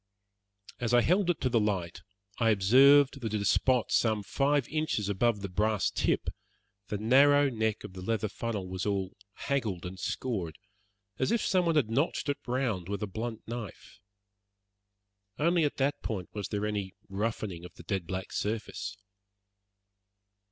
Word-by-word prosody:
As 120 Hz, -1 st, +1 dB
I 120 Hz, -, +6 dB
held 180 Hz, +6 st, +2 dB
it 175 Hz, -, +1 dB
to 130 Hz, -, +1 dB
the 120 Hz, -2 st, +3 dB
light 95 Hz, -5 st, -2 dB, 0.4 s
I 115 Hz, -1 st, +3 dB
observed 135 Hz, +7 st, +5 dB
that 110 Hz, -2 st, -2 dB
at -, -, 0 dB
a -, -, -2 dB
spot 125 Hz, +3 st, +2 dB
some 110 Hz, -3 st, +2 dB
five 140 Hz, +3 st, +1 dB
inches 155 Hz, -10 st, -1 dB
above 105 Hz, +1 st, +1 dB
the 100 Hz, -, -3 dB
brass 105 Hz, +3 st, +1 dB
tip -, -, 0 dB, 0.6 s
the 105 Hz, -, -2 dB
narrow 140 Hz, +6 st, +5 dB
neck 110 Hz, -2 st, -1 dB
of -, -, -9 dB
the 95 Hz, -, -8 dB
leather 110 Hz, +2 st, -1 dB
funnel 105 Hz, -2 st, -4 dB
was 90 Hz, 0 st, -4 dB
all 95 Hz, -2 st, -1 dB, 0.2 s
haggled 110 Hz, -12 st, -2 dB
and 95 Hz, +1 st, -7 dB
scored, 90 Hz, -6 st, -3 dB, 0.6 s
as 130 Hz, -, +1 dB
if 235 Hz, -, +1 dB
someone 175 Hz, -4 st, +2 dB
had 125 Hz, -8 st, +2 dB
notched 145 Hz, +4 st, 0 dB
it 145 Hz, 0 st, -1 dB
round 120 Hz, -8 st, -1 dB
with 100 Hz, 0 st, -3 dB
a -, -, +1 dB
blunt 110 Hz, +3 st, -5 dB
knife. 115 Hz, -4 st, -8 dB, 1.4 s
Only 170 Hz, +1 st, +3 dB
at 145 Hz, -, -2 dB
that 140 Hz, +1 st, 0 dB
point 95 Hz, -5 st, -4 dB
was 105 Hz, -2 st, -4 dB
there 105 Hz, -1 st, -2 dB
any 100 Hz, -3 st, -3 dB
roughening 100 Hz, -3 st, -3 dB
of 90 Hz, -, -11 dB
the -, -, -12 dB
dead 95 Hz, -5 st, -3 dB
black 95 Hz, +1 st, -4 dB
surface. 105 Hz, -1 st, -3 dB
110 Hz, 165 wpm, -30 LUFS, 100-130 Hz, 1.4 s, I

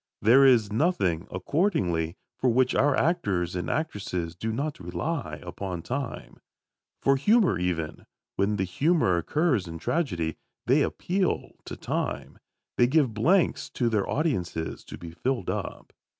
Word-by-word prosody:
There 125 Hz, +6 st, +6 dB
is 110 Hz, -6 st, +4 dB
nothing, 100 Hz, -, +1 dB
accordingly, 90 Hz, -, 0 dB, 0.2 s
for 130 Hz, -, +1 dB
which 125 Hz, +2 st, +3 dB
our 145 Hz, 0 st, +3 dB
actors 100 Hz, -, 0 dB
and 90 Hz, -2 st, -3 dB
actresses 95 Hz, -, -3 dB
do 110 Hz, +5 st, -3 dB
not 145 Hz, +6 st, -3 dB
rely 90 Hz, -, -3 dB
upon 90 Hz, -1 st, -5 dB
time. 130 Hz, 0 st, -5 dB, 0.7 s
For 135 Hz, 0 st, +4 dB
humour 205 Hz, -, +3 dB
even, 85 Hz, -3 st, -3 dB, 0.3 s
when 100 Hz, +2 st, +1 dB
the 95 Hz, -, 0 dB
humour 115 Hz, -, +2 dB
occurs 130 Hz, -, +1 dB
in 85 Hz, 0 st, -6 dB
tragedy, 85 Hz, -, -1 dB, 0.3 s
they -, -, +4 dB
appeal 185 Hz, 0 st, -1 dB
to -, -, -6 dB
time. -, -, -3 dB, 0.4 s
They 120 Hz, -, +5 dB
give 135 Hz, -4 st, +2 dB
blanks 165 Hz, -, +2 dB
to 120 Hz, -2 st, +1 dB
their 105 Hz, -3 st, 0 dB
audiences 95 Hz, -, -2 dB
to -, -, -9 dB
be 85 Hz, -1 st, -9 dB
filled 120 Hz, +3 st, -2 dB
up. -, -, -6 dB
110 Hz, 140 wpm, -27 LUFS, 90-145 Hz, 0.7 s, There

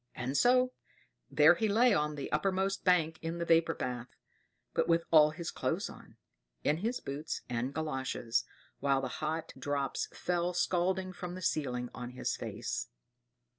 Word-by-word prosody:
And 125 Hz, +2 st, -3 dB
so 250 Hz, -, +4 dB, 0.6 s
there 155 Hz, +3 st, +7 dB
he 220 Hz, +5 st, 0 dB
lay 235 Hz, +4 st, +4 dB
on 150 Hz, 0 st, +1 dB
the 140 Hz, -, -5 dB
uppermost 190 Hz, +4 st, 0 dB
bank 165 Hz, -4 st, +3 dB
in 165 Hz, +1 st, -3 dB
the 170 Hz, -, -2 dB
vapor 165 Hz, 0 st, +4 dB
bath; 125 Hz, -1 st, -4 dB, 0.7 s
but -, -, +1 dB
with 165 Hz, 0 st, +3 dB
all 155 Hz, -2 st, +8 dB
his 165 Hz, +2 st, -5 dB
clothes -, -, -2 dB
on, -, -, -15 dB, 0.5 s
in 150 Hz, -, +2 dB
his 230 Hz, +8 st, -1 dB
boots 145 Hz, +3 st, -4 dB
and 125 Hz, +2 st, -2 dB
galoshes, 130 Hz, -6 st, -1 dB, 0.4 s
while 135 Hz, -1 st, +2 dB
the 130 Hz, -, -2 dB
hot 155 Hz, +1 st, -2 dB
drops 140 Hz, -2 st, -1 dB
fell 175 Hz, 0 st, -1 dB
scalding 185 Hz, +1 st, +1 dB
from 180 Hz, -1 st, -6 dB
the 185 Hz, -, -7 dB
ceiling 125 Hz, -7 st, -1 dB
on 125 Hz, 0 st, -7 dB
his 125 Hz, -, -2 dB
face. -, -, -4 dB
160 Hz, 160 wpm, -32 LUFS, 140-180 Hz, 0.7 s, all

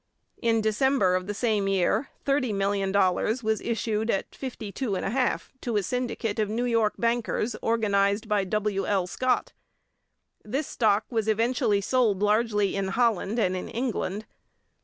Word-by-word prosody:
In 230 Hz, -2 st, +2 dB
December 220 Hz, -2 st, +2 dB
of 185 Hz, 0 st, -1 dB
the 205 Hz, -, -2 dB
same 215 Hz, -3 st, +1 dB
year 195 Hz, +7 st, +1 dB, 0.2 s
$30,000,000 200 Hz, -3 st, +1 dB
was 220 Hz, 0 st, 0 dB
issued 220 Hz, -1 st, -1 dB
at 195 Hz, -, -1 dB
52 250 Hz, -2 st, -5 dB
1/2 225 Hz, +6 st, 0 dB, 0.2 s
to 235 Hz, -3 st, -1 dB
a 205 Hz, -, +1 dB
syndicate 240 Hz, -2 st, -2 dB
of 210 Hz, -1 st, +1 dB
New 235 Hz, +3 st, -1 dB
York 230 Hz, -3 st, +1 dB
bankers 235 Hz, -1 st, 0 dB
organized 205 Hz, -1 st, +1 dB
by 210 Hz, -2 st, +2 dB
W. 200 Hz, 0 st, -1 dB
L. 195 Hz, -3 st, +1 dB
Scott; 255 Hz, +7 st, 0 dB, 0.9 s
this 270 Hz, +8 st, -2 dB
stock 215 Hz, -4 st, +1 dB
was 225 Hz, -2 st, 0 dB
eventually 220 Hz, -2 st, +2 dB
sold 210 Hz, -3 st, +1 dB
largely 210 Hz, -1 st, +2 dB
in 195 Hz, -1 st, -1 dB
Holland 225 Hz, 0 st, +1 dB
and 185 Hz, -5 st, +1 dB
in 185 Hz, -, -5 dB
England. 220 Hz, -4 st, -3 dB
215 Hz, 140 wpm, -26 LUFS, 200-235 Hz, 0.9 s, In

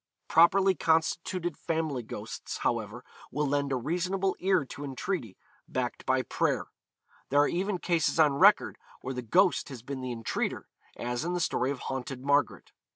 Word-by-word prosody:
Properly 190 Hz, +4 st, +5 dB
constituted 165 Hz, +1 st, 0 dB
family 160 Hz, -5 st, -1 dB
ghosts, 110 Hz, -, -6 dB
however, 115 Hz, +1 st, -2 dB, 0.3 s
will 150 Hz, +2 st, 0 dB
lend 140 Hz, 0 st, 0 dB
a -, -, +2 dB
reasonable 180 Hz, +8 st, -1 dB
ear 185 Hz, -5 st, +2 dB
to 140 Hz, -, -8 dB
entreaty, 135 Hz, -, -4 dB, 0.3 s
backed -, -, -3 dB
by -, -, +2 dB
prayer. -, -, 0 dB, 0.6 s
There 145 Hz, +1 st, +4 dB
are 145 Hz, -, +4 dB
even 190 Hz, +2 st, -1 dB
cases 170 Hz, -2 st, 0 dB
on 150 Hz, -3 st, +5 dB
record -, -, +5 dB, 0.2 s
where 130 Hz, -, -4 dB
the 125 Hz, -, -4 dB
ghost 180 Hz, -, +2 dB
has 125 Hz, -5 st, -9 dB
been 135 Hz, 0 st, -5 dB
the 130 Hz, -1 st, -4 dB
entreater, 115 Hz, -2 st, -3 dB, 0.3 s
as 120 Hz, +2 st, -3 dB
in 175 Hz, +2 st, -2 dB
the 180 Hz, -, -1 dB
story 130 Hz, -6 st, 0 dB
of 140 Hz, -2 st, -4 dB
Haunted 130 Hz, 0 st, -5 dB
Margaret. 145 Hz, 0 st, +1 dB
145 Hz, 160 wpm, -29 LUFS, 130-175 Hz, 0.6 s, Properly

